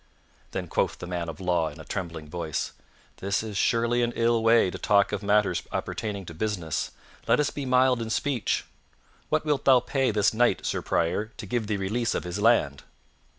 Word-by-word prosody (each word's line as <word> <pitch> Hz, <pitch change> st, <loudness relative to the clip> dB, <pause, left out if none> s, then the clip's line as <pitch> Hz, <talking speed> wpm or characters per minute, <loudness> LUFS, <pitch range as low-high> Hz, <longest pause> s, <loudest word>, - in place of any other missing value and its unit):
Then -, -, -4 dB
quoth -, -, 0 dB
the -, -, -7 dB
man 85 Hz, -1 st, -3 dB
of 80 Hz, -, -8 dB
law 90 Hz, -3 st, +1 dB
in 75 Hz, +2 st, -13 dB
a 80 Hz, -, -10 dB
trembling 85 Hz, -5 st, -5 dB
voice, 80 Hz, -1 st, -3 dB, 0.5 s
"This 100 Hz, +2 st, -1 dB
is 110 Hz, -2 st, -6 dB
surely 115 Hz, +4 st, +2 dB
an 120 Hz, 0 st, 0 dB
ill 115 Hz, 0 st, +2 dB
way 115 Hz, -4 st, +4 dB
to -, -, -7 dB
talk 100 Hz, -1 st, +3 dB
of 100 Hz, -, -2 dB
matters 100 Hz, -4 st, +2 dB
appertaining 100 Hz, -3 st, -3 dB
to 85 Hz, -, -8 dB
business; 90 Hz, -3 st, -2 dB, 0.4 s
let -, -, +4 dB
us 150 Hz, -, +1 dB
be 140 Hz, -2 st, -5 dB
mild 130 Hz, -1 st, +3 dB
in 115 Hz, -, -4 dB
speech. 125 Hz, -2 st, 0 dB, 0.6 s
What 155 Hz, 0 st, +1 dB
wilt 150 Hz, -2 st, +1 dB
thou 130 Hz, -2 st, +7 dB
pay 135 Hz, +2 st, 0 dB
this 105 Hz, -1 st, +2 dB
knight, 120 Hz, -3 st, +2 dB
Sir -, -, -1 dB
Prior, 85 Hz, +5 st, 0 dB
to -, -, -7 dB
give 110 Hz, +1 st, -2 dB
thee 105 Hz, -1 st, 0 dB
release 110 Hz, +5 st, -1 dB
of -, -, -2 dB
his 90 Hz, +2 st, -4 dB
land?" 100 Hz, -, +3 dB
105 Hz, 195 wpm, -26 LUFS, 90-120 Hz, 0.6 s, thou